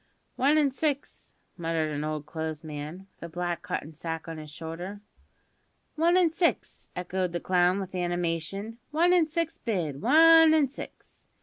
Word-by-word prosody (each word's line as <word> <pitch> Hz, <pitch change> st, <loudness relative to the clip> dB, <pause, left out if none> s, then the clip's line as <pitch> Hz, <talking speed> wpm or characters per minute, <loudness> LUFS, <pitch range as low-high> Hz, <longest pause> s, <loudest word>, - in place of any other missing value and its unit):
"One 285 Hz, +4 st, +3 dB
an' 290 Hz, -3 st, +3 dB
six," 285 Hz, +1 st, -3 dB, 0.2 s
muttered 165 Hz, -2 st, -1 dB
an 145 Hz, 0 st, -3 dB
old 155 Hz, -1 st, -3 dB
clothes 160 Hz, 0 st, -5 dB
man, 155 Hz, +4 st, -7 dB
with -, -, -38 dB
a 170 Hz, -, -6 dB
black 175 Hz, 0 st, -3 dB
cotton 155 Hz, 0 st, -4 dB
sack 165 Hz, +1 st, -5 dB
on 165 Hz, -1 st, -6 dB
his 155 Hz, -1 st, -9 dB
shoulder. 165 Hz, +6 st, -7 dB, 0.9 s
"One 335 Hz, +3 st, +3 dB
an' 350 Hz, -3 st, +4 dB
six," 335 Hz, +1 st, -1 dB
echoed 180 Hz, 0 st, -2 dB
the 175 Hz, -, -1 dB
clown 180 Hz, +1 st, +2 dB
with 190 Hz, -1 st, -6 dB
animation; 175 Hz, +4 st, -2 dB
"one 340 Hz, +4 st, +3 dB
an' 345 Hz, -3 st, +4 dB
six 330 Hz, +1 st, -2 dB
bid; 165 Hz, -, -2 dB
one 325 Hz, +4 st, +7 dB
an' 290 Hz, -4 st, +3 dB
six. 275 Hz, -, -11 dB
180 Hz, 165 wpm, -28 LUFS, -, 0.9 s, one